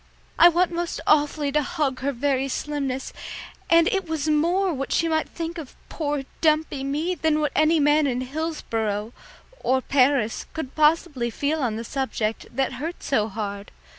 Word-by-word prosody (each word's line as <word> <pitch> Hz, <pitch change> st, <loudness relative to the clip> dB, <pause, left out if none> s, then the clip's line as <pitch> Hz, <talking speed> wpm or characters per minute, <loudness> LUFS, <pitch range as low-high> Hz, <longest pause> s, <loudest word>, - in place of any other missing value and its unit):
I 345 Hz, -, +10 dB
want 350 Hz, +1 st, +2 dB
most 340 Hz, 0 st, -3 dB
awfully 295 Hz, -1 st, +2 dB
to 300 Hz, +1 st, +2 dB
hug 285 Hz, -3 st, -1 dB
her 280 Hz, +1 st, -1 dB
very 270 Hz, +1 st, 0 dB
slimness, 275 Hz, -1 st, -3 dB, 0.6 s
and 335 Hz, 0 st, +6 dB
it 385 Hz, -6 st, -2 dB
was 315 Hz, -2 st, -2 dB
more 340 Hz, +5 st, +2 dB
what 270 Hz, -1 st, -4 dB
she 335 Hz, -, +2 dB
might 315 Hz, -1 st, 0 dB
think 335 Hz, 0 st, -5 dB
of 295 Hz, -5 st, -9 dB
poor 290 Hz, -3 st, -2 dB, 0.2 s
dumpy 310 Hz, -3 st, +2 dB
me 300 Hz, +6 st, -1 dB
than 315 Hz, -3 st, +1 dB
what 300 Hz, -1 st, 0 dB
any 310 Hz, +2 st, +4 dB
man 295 Hz, 0 st, +4 dB
in 250 Hz, -1 st, -1 dB
Hillsboro, 235 Hz, -7 st, -3 dB, 0.5 s
or 260 Hz, +1 st, +2 dB
Paris, 260 Hz, -4 st, +2 dB
could 300 Hz, -5 st, -5 dB
possibly 300 Hz, -5 st, +2 dB
feel 290 Hz, +6 st, -1 dB
on 235 Hz, -5 st, 0 dB
the 225 Hz, -, -4 dB
subject, 230 Hz, -4 st, -2 dB
that 265 Hz, +1 st, -1 dB
hurt 330 Hz, +3 st, -5 dB
so 220 Hz, -6 st, +1 dB
hard. 200 Hz, -1 st, -5 dB
290 Hz, 165 wpm, -24 LUFS, 260-320 Hz, 0.6 s, I